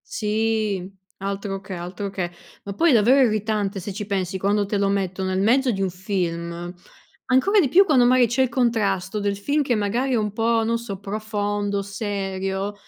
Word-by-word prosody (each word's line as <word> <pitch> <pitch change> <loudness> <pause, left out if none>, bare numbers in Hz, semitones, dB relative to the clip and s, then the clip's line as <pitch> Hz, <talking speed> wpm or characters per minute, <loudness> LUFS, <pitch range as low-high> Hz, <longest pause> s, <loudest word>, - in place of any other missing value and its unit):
Sì, 215 -3 -1 0.3
altro 195 0 -4
che, 195 - -12
altro 180 +3 -5
che. 185 -3 -3 0.3
Ma 200 - -5
poi 335 +11 +3
è - - +5
davvero 245 +5 +5
irritante, 210 -2 -1
se 190 +2 -6
ci 210 +2 -5
pensi, 190 -2 -2
quando 205 +2 +1
te 205 +1 -1
lo 200 0 +1
metto 190 -1 -1
nel 185 0 -1
mezzo 250 +6 +3
di 195 -3 -3
un 190 - +1
film, 175 -2 -3 0.5
ancora 385 +11 +4
di 280 - +1
più 385 +8 +6
quando 280 -8 +4
magari 250 0 +5
c'è 240 +4 0
il 260 - +2
contrasto 210 -5 0
del 200 -1 -1
film 285 +9 0
che 265 -4 0
magari 225 +6 0
è - - +2
un 210 -2 -1
po', 225 +1 +1
non 230 +1 +1
so, 220 -5 -7
profondo, 205 0 -2
serio, 195 -1 -3
205 Hz, 190 wpm, -23 LUFS, 195-230 Hz, 0.5 s, più